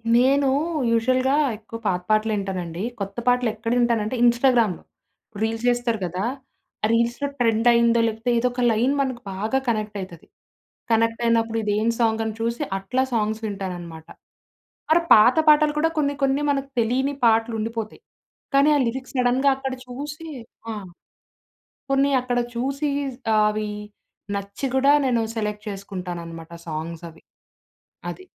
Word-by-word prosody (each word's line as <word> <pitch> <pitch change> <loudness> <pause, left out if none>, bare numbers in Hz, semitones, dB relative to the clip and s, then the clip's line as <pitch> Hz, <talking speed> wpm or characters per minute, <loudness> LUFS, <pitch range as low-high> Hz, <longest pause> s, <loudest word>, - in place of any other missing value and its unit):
నేనూ 270 +2 +4 0.4
యూజువల్‌గా 255 +4 +2 0.2
ఎక్కువ 225 +1 -9
పాత 180 -2 0
పాటలింటానండి. 195 -5 -1 0.2
కొత్త 195 +2 -5
పాటలు 245 -1 +3
ఎక్కడ 230 +1 -4
వింటానంటే, 235 -1 +1
ఇన్‌స్టాగ్రామ్‌లో. 240 -5 +3 0.6
రీల్స్ 225 +1 -1
జేస్తరు 240 -2 +1
గదా! 180 +4 -3 0.6
ఆ - - +4
రీల్స్‌లో 235 +5 +1
ట్రెండయిందో, 235 0 +4
లేపోతే 225 +2 -3
ఏదోక 245 +1 0
లైన్ 240 +5 +2
మనకు 255 -3 -2
బాగా 215 +8 0
కనెక్టయితది. 205 -6 -4 0.6
కనెక్టయినప్పుడు 230 0 +2
ఇదెం 210 +2 +1
సాంగని 220 -1 +1
చూసి, 235 +5 -1
అట్లా 235 +7 -1
సాంగ్స్ 220 0 0
వింటాననమాట. 175 -5 -6 0.8
మరా 340 - +5
పాత 230 +7 +5
పాటలు 300 0 +5
కూడా, 325 +2 +3
కొన్ని 285 -1 +1
కొన్ని 275 +2 +2
మనకు 275 -1 -2
తెలియని 265 +5 0
పాటలుండిపోతాయి. 225 - 0 0.5
కానీ, 280 +2 +5
ఆ - - +1
లిరిక్ 255 +3 -4
సడెన్‌గా 255 +2 +2
అక్కడ 265 -1 -4
చూసి 295 +5 -7 0.5
ఆ! - - -5 1.2
కొన్ని 275 +1 +3
అక్కడ 245 -1 -1 0.2
చూసి, 275 +4 -1 0.5
ఆవి 210 0 0 0.7
నచ్చి 200 +7 -4
కూడా, 275 +2 +5
నేను 240 -3 +2
సెలెక్ట్ 210 0 -3
చేసుకుంటాననమాట 175 -4 -7 0.2
సాంగ్సవి. 165 +1 -6 0.9
అది. 375 - -9
230 Hz, 120 wpm, -23 LUFS, 210-255 Hz, 1.2 s, మరా